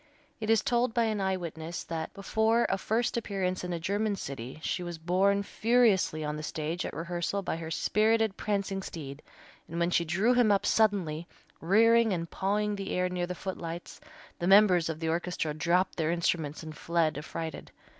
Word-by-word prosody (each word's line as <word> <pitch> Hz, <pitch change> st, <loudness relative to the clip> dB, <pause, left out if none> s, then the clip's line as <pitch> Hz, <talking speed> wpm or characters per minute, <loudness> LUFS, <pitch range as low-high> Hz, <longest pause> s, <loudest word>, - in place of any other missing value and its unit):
It 215 Hz, -1 st, -4 dB
is 225 Hz, -1 st, +4 dB
told 240 Hz, -1 st, +1 dB
by 235 Hz, -, +3 dB
an 215 Hz, -2 st, 0 dB
eye 190 Hz, -1 st, +1 dB
witness 165 Hz, -1 st, -6 dB
that 165 Hz, -1 st, -4 dB
before 220 Hz, +4 st, +2 dB
a 195 Hz, -, 0 dB
first 230 Hz, +4 st, 0 dB
appearance 190 Hz, -5 st, -2 dB
in 180 Hz, -, -4 dB
a 170 Hz, -, -2 dB
German 205 Hz, +4 st, 0 dB
city 135 Hz, -5 st, -7 dB
she 180 Hz, -, -1 dB
was 175 Hz, -1 st, -5 dB
borne 190 Hz, +4 st, +2 dB
furiously 215 Hz, -8 st, +2 dB
on 150 Hz, 0 st, -3 dB
the -, -, -5 dB
stage 155 Hz, +3 st, -3 dB
at -, -, -7 dB
rehearsal 175 Hz, +4 st, -2 dB
by 165 Hz, -, -2 dB
her 165 Hz, -1 st, -6 dB
spirited, 215 Hz, +4 st, +2 dB
prancing 200 Hz, -2 st, -2 dB
steed, 145 Hz, -6 st, -7 dB, 0.5 s
and 165 Hz, +2 st, -4 dB
when 170 Hz, +1 st, +1 dB
she 170 Hz, -, +3 dB
drew 190 Hz, +9 st, +2 dB
him 245 Hz, -4 st, +4 dB
up 200 Hz, -, +2 dB
suddenly, 180 Hz, -7 st, +1 dB, 0.3 s
rearing 225 Hz, +4 st, +4 dB
and 170 Hz, -2 st, -4 dB
pawing 205 Hz, +1 st, 0 dB
the 195 Hz, -1 st, -5 dB
air, 180 Hz, 0 st, +1 dB
near 180 Hz, -1 st, -2 dB
the 180 Hz, -, -4 dB
footlights, 175 Hz, -2 st, -6 dB, 0.4 s
the 175 Hz, -, -1 dB
members 190 Hz, -4 st, +6 dB
of 160 Hz, -1 st, -4 dB
the 165 Hz, -1 st, -2 dB
orchestra 170 Hz, -2 st, -1 dB
dropped 170 Hz, +5 st, +1 dB
their 160 Hz, -2 st, 0 dB
instruments 165 Hz, -3 st, -1 dB
and 155 Hz, -1 st, -8 dB
fled 165 Hz, -2 st, 0 dB
affrighted. 160 Hz, +2 st, -6 dB
180 Hz, 185 wpm, -29 LUFS, 165-205 Hz, 0.5 s, members